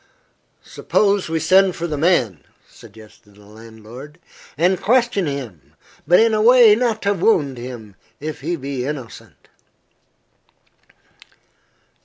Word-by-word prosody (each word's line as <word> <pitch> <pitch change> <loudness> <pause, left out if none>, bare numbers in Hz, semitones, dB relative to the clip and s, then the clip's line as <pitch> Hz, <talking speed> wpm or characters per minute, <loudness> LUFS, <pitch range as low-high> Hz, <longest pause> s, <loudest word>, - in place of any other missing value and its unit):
"Suppose 200 -4 -1
we 165 0 -1
send 185 +3 +3
for 170 - -5
the 155 -3 -4
man," 135 - 0 0.2
suggested 105 -2 -18
the 105 0 -19
landlord, 115 - -13 0.4
"and 180 +4 +1
question 235 -6 +1
him, 125 - -8 0.3
but 175 - +5
in 225 0 +3
a 215 - +1
way 240 -1 +6
not 225 -1 -1
to 200 0 +1
wound 155 - 0
him, 120 -5 -10 0.2
if 155 +1 -7
he 170 +5 -3
be 135 -3 -5
innocent." 130 -5 -9
150 Hz, 120 wpm, -19 LUFS, 115-195 Hz, 0.4 s, way